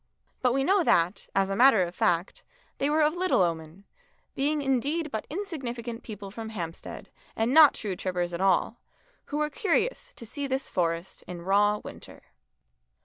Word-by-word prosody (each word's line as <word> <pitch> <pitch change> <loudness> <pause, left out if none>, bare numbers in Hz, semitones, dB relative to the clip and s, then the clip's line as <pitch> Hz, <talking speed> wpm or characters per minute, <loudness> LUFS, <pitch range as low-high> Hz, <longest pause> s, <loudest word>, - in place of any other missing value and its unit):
But 250 -1 +2
we 270 - +1
know 380 +4 +3
that, 175 - +2
as 195 0 +2
a - - 0
matter 235 -4 +6
of 175 0 -5
fact, 180 - 0 0.4
they 280 - +1
were 305 +1 +3
of 300 +1 +3
little 360 - +2
omen, 165 +2 -4 0.5
being 290 +2 0
indeed 280 +4 0
but 220 - -4
insignificant 250 - -5
people 205 -3 -8
from 220 +1 -7
Hampstead 170 -6 -7 0.2
and 225 +3 0
not 310 -2 +8
true 200 -4 -4
trippers 180 -1 -2
at 170 - -3
all, 195 +4 +2 0.5
who 290 - -4
were 300 0 0
curious 485 - 0
to 230 - -9
see 280 +5 -4
this 270 0 -2
forest 170 0 -2
in 175 -1 -7
raw 205 +3 +3
winter. - - -11
230 Hz, 170 wpm, -27 LUFS, 185-290 Hz, 0.5 s, not